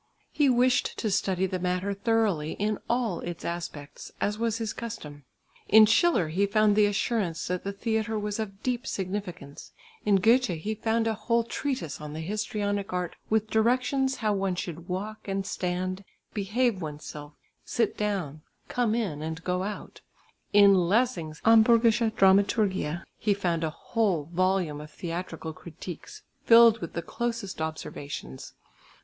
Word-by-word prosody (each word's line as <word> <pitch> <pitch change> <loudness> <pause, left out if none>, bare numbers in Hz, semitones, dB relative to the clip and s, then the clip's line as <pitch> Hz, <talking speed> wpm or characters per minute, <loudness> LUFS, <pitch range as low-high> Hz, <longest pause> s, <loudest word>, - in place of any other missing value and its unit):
He 290 -3 +3
wished 250 0 +2
to 215 - -1
study 190 -2 +1
the 185 -1 -3
matter 180 +2 -1
thoroughly 200 -7 0
in 210 +1 -1
all 235 -6 0
its 175 -1 -6
aspects, 170 -4 -6
as 210 +1 -1
was 230 -1 0
his 225 -1 -3
custom. 150 - -7 0.4
In 220 0 +9
Schiller 225 - +3
he 195 +5 +1
found 210 0 +3
the 210 -1 +5
assurance 200 -5 -1
that 180 0 -2
the 200 - -2
theatre 220 +1 -1
was 210 0 -3
of 200 -2 -5
deep 250 0 -1
significance; 185 -6 -5 0.3
in 205 -1 +3
Goethe 230 +6 +4
he 215 +7 -2
found 225 +1 0
a 225 - +1
whole 235 +2 +1
treatise 245 - -4
on 150 -1 -7
the 155 - -5
histrionic 205 +1 -2
art 180 -1 -2
with 220 0 +1
directions 255 +4 +2
how 215 -4 0
one 195 -2 0
should 170 -1 -6
walk 210 +4 -5
and 195 0 -2
stand, 185 +1 -3 0.3
behave 210 +1 0
oneself, 150 -1 -7 0.3
sit 230 -3 0
down, 185 -8 -2 0.3
come 235 -3 0
in 190 -11 -2
and 160 +1 -5
go 180 0 -1
out; 205 +2 -6 0.5
in 200 -1 +7
Lessing's 180 -3 +1
Hamburgische 225 0 +5
Dramaturgie 190 -4 +3 0.2
he 210 -2 +2
found 175 -4 -1
a 160 - 0
whole 195 -1 -1
volume 185 -4 +1
of 150 - -10
theatrical 165 -1 -5
critiques 170 +1 -10 0.2
filled 230 -1 +7
with 170 - -6
the 170 - -3
closest 230 -3 -4
observations. 145 - -6
200 Hz, 150 wpm, -27 LUFS, 175-225 Hz, 0.5 s, In